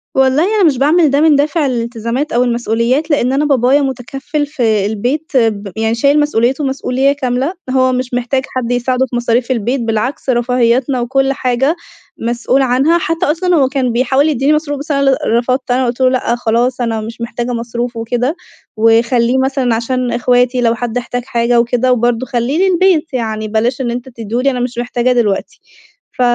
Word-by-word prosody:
والله 265 +4 +3
أنا 410 - +3
مش 295 -7 +3
باعمل 305 +3 +3
ده 285 +2 +2
من 315 -2 +5
دافع 295 +2 +1
الالتزامات 235 +3 -2
أو 240 +1 +2
المسؤوليات، 240 +5 0
لإن 265 -3 +1
أنا 290 +2 +1
بابايا 275 0 +3
متكفّل 270 +3 -3
في 225 -9 0
البيت 245 +10 -2
ب 210 -4 0
يعني 225 +1 0
شايل 280 +5 +3
مسؤوليته 270 -1 +1
مسؤولية 270 0 0
كاملة، 265 +3 -2 0.2
هو 255 0 +2
مش 255 0 -3
محتاج 245 +2 0
حد 245 -1 -2
يساعده 250 +1 0
في 240 - -5
مصاريف 240 +1 0
البيت 245 +2 -1
بالعكس، 230 +5 -2
رفاهياتنا 250 +1 +1
وكلّ 270 +3 +1
حاجة 265 +4 0 0.4
مسؤول 240 +3 0
عنها، 265 +6 +2
حتّى 330 -1 -1
أصلًا 345 +4 +1
هو 275 -4 +3
كان 265 -3 -1
بيحاول 265 +5 +2
يدّيني 280 +1 +1
مصروف 295 -2 -2
بس 300 +2 -6
أنا 275 - +1
اللي 270 -1 +3 0.2
رفضت، 255 +1 -1
أنا 255 +1 +1
قُلت 240 +1 -3
له: 255 - +5
"لأ 255 -2 0
خلاص 240 +2 0
أنا 225 -2 -1
مش 230 +2 -8
محتاجة 240 +1 -3
مصروف" 235 +1 -4
وكده، 245 +6 -1 0.4
وخلّيه 235 +2 +3
مثلًا 265 -3 0
عشان 250 +2 -2
إخواتي 245 +1 +1
لو 230 -1 +2
حد 240 0 -3
احتاج 245 0 -4
حاجة 235 -1 +1
وكده، 245 +2 +1
وبرضو 240 0 +1
خلّيه 275 +9 0
للبيت، 350 -4 +2
يعني 220 -3 -3
بلاش 230 +5 -1
إن 240 - -1
أنت 245 +2 -5
تديه 230 0 -4
لي 275 +1 +2
أنا 250 - -3
مش 245 -1 -3
محتاجاه 245 +1 0
دلوقتي، 220 -5 -1 0.6
ف 255 - -2
250 Hz, 180 wpm, -15 LUFS, 235-275 Hz, 0.6 s, من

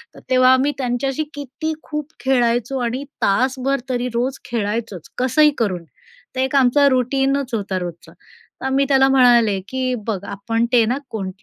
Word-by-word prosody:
तर - - -12
तेव्हा 255 0 +5
आम्ही 265 +3 +2
त्यांच्याशी 270 +3 -1
किती 290 +3 -4
खूप 300 0 -5
खेळायचो 245 -1 +1
आणि 245 +3 -2 0.2
तासभर 260 +6 +1
तरी 250 -1 -1
रोज 250 +3 -1
खेळायचोच 215 -5 -3
कसंही 300 +4 +4
करून. 185 -7 -1 0.5
ते 260 - +1
एक 265 +1 -2
आमचं 275 +2 +4
रूटीनच 270 +1 0
होता 200 -4 -2
रोजचा. 175 -2 -8 0.5
तर 265 - -1
मी 275 0 +3
त्याला 270 -1 +5
म्हणाले 240 -6 +4
की 255 0 -2
बघ 220 -3 -1
आपण 215 +4 -1
ते 240 -2 +5
ना 245 +4 0
कोण 195 -4 -4
255 Hz, 155 wpm, -20 LUFS, 230-270 Hz, 0.5 s, तेव्हा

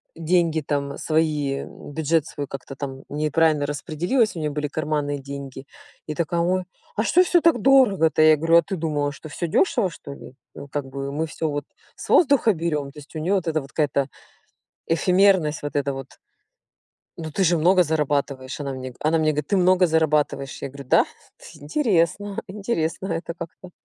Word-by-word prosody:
деньги 165 -1 +1
там 140 -1 -2
свои, 150 -3 0
бюджет 160 +1 -2
свой 145 - -5
как-то 135 0 -8
там 135 -1 -6
неправильно 155 0 +1
распределилась, 175 - 0
у - - -5
неё 150 -1 -2
были 150 0 -2
карманные 145 -1 -2
деньги. 135 -1 -8 0.4
И 155 - -4
такая 170 +1 -1
"Ой, 185 +2 0 0.3
а 215 - +1
что 355 +10 +4
всё 350 -1 +3
так 330 -6 +4
дорого-то?" 205 -13 +4
Я 155 0 +7
говорю: 165 +2 +4
"А - - +7
ты 195 +2 -5
думала, 150 -4 -1
что 155 - -11
всё 170 +3 -3
дёшево, 220 - +2
что 145 -4 -10
ли? 130 - -12 0.2
Ну, 140 - -9
как 140 0 -3
бы 135 +1 -5
мы 155 +3 -1
всё, 160 0 -3
вот, 145 -1 -3 0.3
с - - -10
воздуха 280 -8 +5
берём". 155 -5 -2
То 150 - -12
есть, 145 - -15
у - - -3
неё 180 +6 +1
вот 180 -3 -1
эта 160 -1 +1
вот 135 +1 -13
какая-то 140 -3 0 0.8
эфемерность, 180 -2 +3
вот 145 - -5
эта 140 -1 0
вот. 135 -1 -7 1.1
Ну, 160 -2 -6
ты 195 - 0
же 170 0 +3
много 180 +3 +4
зарабатываешь. 145 -4 -1
Она 140 -2 -4
мне 130 -1 -7
она 155 +2 +2
мне 155 -1 +2
говорит: 150 -1 -3
"Ты - - +1
много 185 0 +4
зарабатываешь". 150 -4 0
Я - - -3
говорю: 140 +1 -10
"Да, - - +5 0.5
интересно, 190 - 0
интересно 190 -3 -2
это 170 -1 -3
как-то". 170 +2 -10
155 Hz, 185 wpm, -23 LUFS, 145-175 Hz, 1.1 s, Я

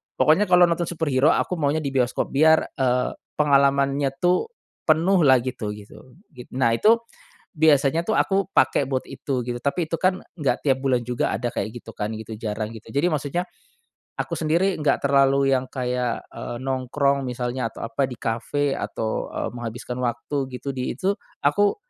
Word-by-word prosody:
Pokoknya 175 +7 +4
kalo 180 -1 +5
nonton 170 0 0
superhero 155 -4 +2
aku 180 - -1
maunya 150 +2 +1
di 140 - -2
bioskop 125 -2 0
biar, 160 +3 +4
eee, 125 -2 +1 0.3
pengalamannya 140 -1 +3
tuh 180 - +3 0.4
penuh 170 +4 +3
lah 130 -2 +7
gitu, 125 -5 -4
gitu 105 +5 -14 0.2
git 125 -1 -11
nah, 125 -3 +2
itu 220 - +5 0.6
biasanya 150 0 +4
tuh 220 - +1
aku 195 -1 +1
pake - - +3
buat 130 -1 -1
itu 130 -2 -4
gitu 120 0 -3
tapi 155 +4 0
itu - - -2
kan 185 0 +2 0.2
nggak 135 -5 0
tiap 135 -2 +3
bulan 130 -3 +1
juga 125 -1 -1
ada 120 - -2
kayak 105 - -2
gitu 115 - -11
kan 105 +1 -2
gitu 110 0 -7
jarang 110 0 -3
gitu 110 0 -12
jadi 140 +8 +1
maksudnya, 150 +4 -1 0.8
aku - - -2
sendiri 170 +5 +1
nggak 150 - +1
terlalu 135 0 +4
yang 130 - -3
kayak, 125 -2 -2
eee, 120 - -6
nongkrong 135 +1 0
misalnya 125 -1 -3
atau - - -11
apa 115 +4 -1
di 125 - -7
kafe 135 +5 -1
atau, 110 -1 -3
eee, - - -3
menghabiskan 120 +1 -6
waktu 130 +3 -2
gitu 125 +2 -6
di 125 -1 -2
itu 195 +6 0 0.3
aku, 200 +8 +3
135 Hz, 175 wpm, -23 LUFS, 125-155 Hz, 0.8 s, lah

